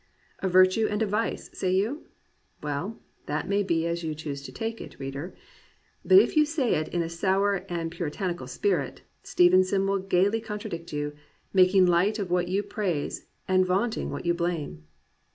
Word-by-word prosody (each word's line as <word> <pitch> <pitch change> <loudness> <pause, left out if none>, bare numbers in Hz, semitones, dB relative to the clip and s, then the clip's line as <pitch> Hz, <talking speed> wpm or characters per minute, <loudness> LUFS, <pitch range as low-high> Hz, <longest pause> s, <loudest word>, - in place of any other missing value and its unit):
"A 190 - -1
virtue 185 +4 +5
and 210 - -1
a - - +2
vice," 210 +3 -2
say 185 -1 0
you.^ 225 +11 -1 0.6
Well, 150 +9 -3 0.3
that 150 +1 -2
may 200 +1 +2
be 165 -4 0
as 170 0 -2
you 155 -1 -3
choose 145 -2 -5
to 140 - -9
take 225 0 -4
it, - - -10
reader. 135 +6 -6 0.7
But 375 - +6
if 390 - +5
you 305 - +6
say 300 -5 0
it 155 0 0
in 175 -1 -1
a - - -3
sour 190 +4 +1
or - - -17
a 170 -1 -2
puritanical 170 -2 -4
spirit, 140 +2 -1 0.2
Stevenson 185 +2 +3
will 195 0 +1
gaily 195 +3 +1
contradict 210 -6 -6
you, 145 0 -3 0.4
making 185 0 +5
light 180 +5 +3
of 195 -4 -4
what 180 0 +1
you 195 +3 0
praise 200 -7 -3 0.2
and 185 0 +4
vaunting 200 +6 0
what - - -5
you 170 - +3
blame. 165 - -3
185 Hz, 180 wpm, -27 LUFS, 170-205 Hz, 0.7 s, But